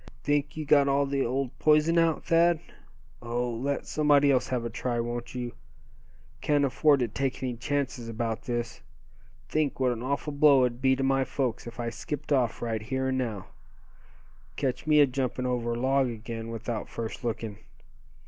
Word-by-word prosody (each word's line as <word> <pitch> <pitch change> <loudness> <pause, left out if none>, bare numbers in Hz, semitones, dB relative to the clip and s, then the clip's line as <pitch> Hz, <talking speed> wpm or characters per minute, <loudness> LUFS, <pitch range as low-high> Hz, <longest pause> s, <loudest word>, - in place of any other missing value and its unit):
"Think 145 -1 0
you 155 - -3
got 140 -1 +5
all 140 +1 +2
the 140 -1 0
old 130 +1 -1
poison 155 +2 +4
out, 165 -1 +1
Thad? 170 0 +4 0.6
Oh! 120 +1 -2
let 135 +5 -2
somebody 145 -2 +4
else 130 -2 +2
have 125 -2 -2
a - - -2
try, 120 0 -2
won't 120 +1 -4
you? 120 -1 -4 0.9
Can't 145 -1 +2
afford 140 +2 +3
to 120 - +1
take 130 +4 -3
any 125 -2 -2
chances 130 -1 -2
about 115 +1 -3
this. 120 -2 -3 0.7
Think 150 -3 -1
what 130 -1 +2
an 115 -1 -4
awful 140 +3 -2
blow 140 -3 +6
it'd 120 0 -4
be 130 0 +4
to 135 - -2
my 135 0 +2
folks 130 -4 -2
if 120 +1 -9
I 115 -1 -2
skipped 145 +6 -6
off 125 -6 +1
right 115 -2 -2
here 130 +3 -2
and 130 0 0
now. 110 -6 -4 1.1
Ketch 135 +1 -2
me 150 -1 +6
a - - +8
jumpin' 130 -1 -2
over 120 -2 -1
a 115 - -3
log 135 0 +2
again 115 0 -6
without 115 0 -4
first 115 +2 -6
lookin'. 110 -3 -3
130 Hz, 180 wpm, -28 LUFS, 120-140 Hz, 1.1 s, a